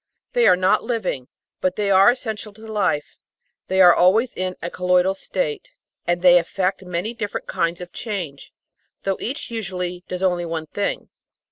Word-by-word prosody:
They 485 -1 +4
are - - +7
not 185 +1 +2
living, 185 - -2 0.3
but 185 0 0
they 205 -1 0
are 195 +2 +7
essential 220 -4 -3
to 220 +2 -14
life; 205 -9 -1 0.5
they 190 0 +3
are 175 -1 +9
always 215 +9 +3
in 185 0 -3
a 170 - -5
"col 180 0 -5
loidal" 180 +1 +4
state, - - -3 0.4
and 175 +1 0
they 180 -1 +8
effect 185 +3 -1
many 180 +5 -3
different 210 -3 -4
kinds 170 +1 -1
of 175 -1 -9
change, 180 - -5 0.5
though 195 -1 0
each 265 +1 -4
usually 180 -5 -4
does 180 +1 -4
only 180 -2 +1
one 165 -1 -3
thing. 200 +6 -3
185 Hz, 170 wpm, -22 LUFS, 180-215 Hz, 0.5 s, are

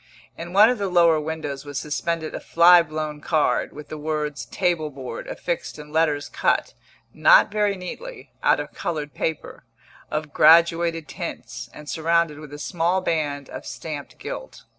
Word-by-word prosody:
In 170 +1 -7
one 210 +5 +7
of 250 - -3
the 200 -1 -1
lower 170 -3 +4
windows 150 -3 -4
was 145 -2 -4
suspended 160 +1 -3
a - - -4
fly 175 +1 +6
blown 155 -2 -5
card, 155 -1 +1
with 150 0 -11
the 155 - -6
words 150 -1 -3
"Table 175 -5 0
Board" 130 -4 -7
affixed 170 -1 -4
in 150 0 -11
letters 150 -2 +1
cut - - 0 0.4
(not - - +6
very 210 -1 +1
neatly) 485 - -8
out - - +3
of - - -6
coloured 150 -4 -4
paper, 160 -2 -4 0.5
of 150 -1 -4
graduated 165 0 +4
tints, - - -7
and 150 - -12
surrounded 160 +1 +1
with 150 -2 -11
a 145 - -7
small 175 +4 0
band 145 -5 -2
of - - -8
stamped 150 -3 -7
gilt. - - -8
160 Hz, 160 wpm, -23 LUFS, 150-170 Hz, 0.5 s, one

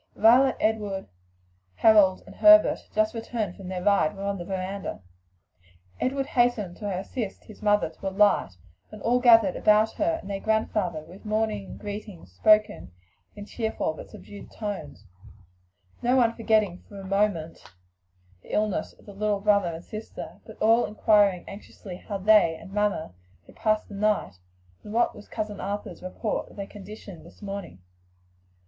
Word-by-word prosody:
Violet, 250 +4 +5
Edward, 210 -3 -1 0.7
Harold 205 - +5
and - - -12
Herbert, 315 0 +6
just 215 0 +1
returned 225 -4 -4
from 195 -3 -10
their 180 -1 -4
ride, 200 -5 +3
were 195 - -6
on 200 -1 -2
the 175 - -6
veranda. 190 - -5 1.0
Edward 270 +1 -1
hastened 240 -9 +1
to 205 -2 -4
assist 195 +3 -4
his 215 - -14
mother 210 -1 +3
to 165 +4 -6
alight, 200 - +3 0.4
and 215 - -11
all 245 +2 +3
gathered 225 -6 +6
about 215 +1 +4
her 325 +1 0
and - - -11
their 200 -1 -3
grandfather 210 -6 0
with 180 +5 -14
morning 215 -2 -2
greetings 205 - -8
spoken 210 - +3 0.4
in 205 -1 -8
cheerful 220 -7 -2
but - - -11
subdued 205 - -12
tones; 150 - -6 1.0
no 245 +2 +2
one 235 -3 +4
forgetting 215 -6 +1
for 200 - -10
a 195 - -9
moment 195 -5 0 0.8
the - - -12
illness 210 -2 -1
of - - -23
the 205 - -11
little 210 +1 0
pet 195 - -13
brother 200 -3 +4
and 165 - -9
sister, 215 +1 -8
but - - -11
all 225 +2 +4
inquiring 205 -4 +3
anxiously 195 -2 -10
how 200 +2 -5
they 195 -4 +4
and 190 - -12
"Mamma" 205 - -1 0.3
had - - -18
passed 215 0 0
the - - -11
night, 205 - 0 0.4
and 210 - -9
what 235 +1 +2
was 205 - -13
cousin 210 -2 -5
Arthur's 205 +1 -5
report 185 +4 -3
of - - -16
their 200 - -5
condition 200 -3 -11
this - - -16
morning. 195 - -7
205 Hz, 160 wpm, -26 LUFS, 195-220 Hz, 1.0 s, Herbert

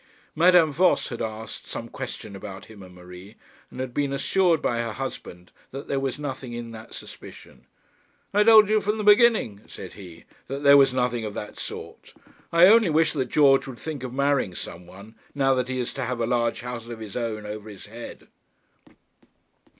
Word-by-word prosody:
Madame 170 -1 +5
Voss 180 +5 +2
had 120 - -6
asked 110 0 -6
some - - -6
question 100 - -7
about 95 0 -9
him 110 -2 -14
and 90 -1 -13
Marie, 90 +3 -13 0.3
and - - -11
had 130 -1 -4
been 140 0 -1
assured 165 +4 +2
by 120 -4 -1
her 115 -2 -3
husband 90 -9 -7 0.2
that 135 +2 -8
there 135 - -1
was 135 -2 -3
nothing 135 -4 -6
in 120 -1 -6
that 110 -1 -11
suspicion. - - -12 0.7
'I 210 +1 +4
told 220 -2 +8
you 215 0 +2
from 210 +2 -1
the 215 - -3
beginning,' 210 - +4
said 95 - -10
he, 90 -5 -12 0.2
'that 140 +2 -5
there 140 0 +8
was 135 -2 +6
nothing 125 -2 -1
of 105 -1 -5
that 105 - -7
sort. - - -8 0.4
I 170 +1 +7
only 215 -1 +6
wish 160 0 +2
that 135 -4 -1
George 135 -3 +4
would 130 -3 -8
think 150 +3 -6
of 130 - -5
marrying 140 -8 0
some 85 +1 -8
one, 100 +5 -13 0.2
now 135 -1 +3
that 125 -1 -1
he 130 0 -2
is 125 - -3
to 135 - -3
have 125 0 -3
a 115 - +1
large 120 -1 0
house 120 -1 -7
of 120 - -6
his 110 -3 -9
own 110 -3 -3
over 105 +1 -7
his 100 -2 -11
head.' 115 +3 -10
125 Hz, 195 wpm, -25 LUFS, 110-145 Hz, 0.7 s, told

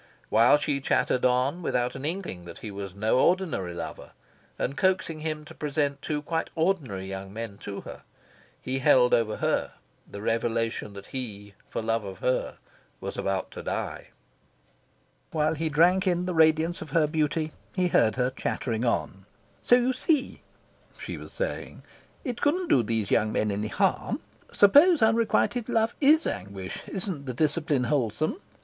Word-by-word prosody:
While 115 +6 +6
she 145 -1 -1
chattered 130 -1 +1
on, 130 +7 +2
without 125 -6 0
an 135 +1 -6
inkling 160 - -4
that 85 - -9
he 105 - -5
was 100 -1 -7
no 110 +5 +2
ordinary 155 - +1
lover, 85 - -7 0.4
and 135 - -2
coaxing 185 -3 +1
him 155 -1 -4
to 160 - -11
present 145 -2 -1
two 150 0 -3
quite 165 +1 -2
ordinary 155 - 0
young 95 0 -6
men 110 -1 -6
to 100 -1 -6
her, - - -10 0.6
he 130 +1 -3
held 125 -1 +5
over 110 -2 +2
her - - 0 0.4
the 100 - -8
revelation 115 -2 -1
that 100 0 -10
he 105 -6 -6 0.2
for - - -3
love 115 0 0
of 95 -2 -7
her 125 +6 -1 0.4
was - - -5
about 95 -1 -2
to - - -7
die. - - -4
And, - - -37
while 155 0 +2
he 160 +1 -2
drank 175 +5 +4
in 180 0 +1
the 180 - -2
radiance 160 +1 +3
of 155 - -7
her 155 +2 +3
beauty, 155 0 0 0.2
he 180 -2 +2
heard 110 -8 +3
her 125 0 +1
chattering 120 -3 -2
on. 95 -5 -1 0.3
"So 245 - +5
you 250 +1 +2
see," 280 +2 0 0.6
she - - -6
was - - -10
saying, - - -4 0.4
"it 245 -4 -4
couldn't 340 +4 +1
do 125 - +5
those 110 -2 -2
young 110 0 +3
men 110 -1 0
any 105 +2 -2
harm. - - 0 0.3
Suppose 290 - +6
unrequited 230 +1 +2
love 225 -1 +2
IS 305 +3 +5
anguish: 95 -1 -5
isn't 180 -8 -2
the 125 - -4
discipline 150 -2 +1
wholesome? 150 - 0
140 Hz, 165 wpm, -27 LUFS, 110-175 Hz, 0.6 s, While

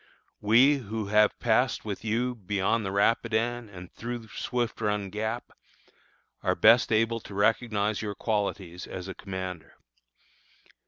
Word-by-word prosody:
We, 125 +7 +5
who 110 -3 -5
have 105 0 +4
passed 120 +1 +1
with 100 -2 -5
you 120 +3 0
beyond 105 +1 -1
the 95 - -3
Rapidan 115 +3 +1
and 90 -2 -11
through 115 -1 -6
Swift 120 +1 -3
Run 105 -2 -1
Gap, 110 +1 -3 0.9
are - - +1
best 115 +1 +5
able 115 +1 +2
to 100 - -11
recognize 105 0 +1
your 105 -2 -4
qualities 100 -5 -2
as 90 0 -7
a 95 - -5
commander. 95 -4 -7
110 Hz, 130 wpm, -28 LUFS, 100-115 Hz, 0.9 s, We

